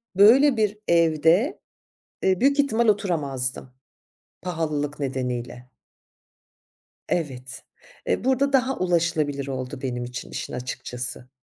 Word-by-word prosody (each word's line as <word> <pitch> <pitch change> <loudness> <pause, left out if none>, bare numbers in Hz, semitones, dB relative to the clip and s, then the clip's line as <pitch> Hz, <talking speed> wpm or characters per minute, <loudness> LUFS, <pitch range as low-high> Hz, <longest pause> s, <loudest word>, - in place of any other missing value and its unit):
böyle 245 +7 +6
bir 210 -1 +1
evde, 170 - +3 0.6
eee, 190 -1 +2
büyük 280 +2 +3
ihtimal 235 -5 +1
oturamazdım 145 -11 -1 0.7
pahalılık 155 -4 -2
nedeniyle. 125 -2 -4 1.4
Evet. 135 -6 -3 0.4
Eee, - - 0
burada 265 +2 +2
daha 265 0 +2
ulaşılabilir 160 -6 0
oldu 130 -1 -5
benim 125 -2 -3
için 120 0 -7
işin - - -5
açıkçası. 125 0 -5
160 Hz, 100 wpm, -24 LUFS, 130-210 Hz, 1.4 s, böyle